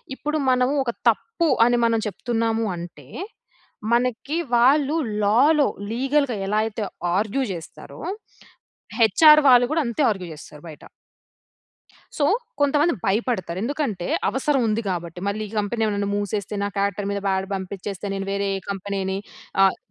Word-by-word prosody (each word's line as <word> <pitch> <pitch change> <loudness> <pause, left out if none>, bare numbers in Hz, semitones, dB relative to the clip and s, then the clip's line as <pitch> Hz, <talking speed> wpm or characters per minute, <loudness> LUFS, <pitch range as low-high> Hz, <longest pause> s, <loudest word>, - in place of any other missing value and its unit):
ఇప్పుడు 300 +3 -2
మనము 255 +2 +2
ఒక 235 - -1 0.2
తప్పు 340 -7 0 0.2
అని 240 0 +3
మనం 230 -1 +2
చెప్తున్నాము 225 +2 -1
అంటే, 170 -6 -9 0.9
మనకి 250 +6 0 0.2
వాళ్ళు 280 +5 +4 0.3
లా‌లో 275 +8 +4 0.2
లీగల్‌గా 265 0 +1
ఎలా 210 +1 +1
అయితే 220 -1 -4 0.3
ఆర్గ్యూ 220 +6 0
జేస్తారో, 170 -3 -9 1.0
హెచ్‌ఆర్ 300 +8 +7
వాళ్ళు 245 -1 +7
గూడా 320 -1 +2
అంతే 235 +5 -2
ఆర్గ్యూ 185 -4 -5
జేస్తారు 150 0 -13
బయట. 150 - -12 1.3
సో, 290 - +1 0.4
కొంతమంది 295 +4 +3
భయపడతారు. 195 -4 -1
ఎందుకంటే 235 - -2 0.2
అవసరం 270 0 +1
ఉంది 220 +1 0
కాబట్టి. 175 -1 -4
మళ్ళీ 200 +2 -2
ఈ - - -13
కంపెనీ 225 +3 -2
ఏమన్నా 200 -1 -1
మూసేస్తే, 205 0 -3
నా 200 - -1
కారెక్టర్ 200 0 -1
మీద 200 - -2
బ్యాడ్ 190 0 0
పంపించేస్తే. 195 +1 -6
నేను 195 0 -4
వేరే 200 0 -1 0.2
కంపెనీని 195 -1 -3 0.5
ఆహ్ 195 - +4
215 Hz, 135 wpm, -23 LUFS, 195-260 Hz, 1.3 s, హెచ్‌ఆర్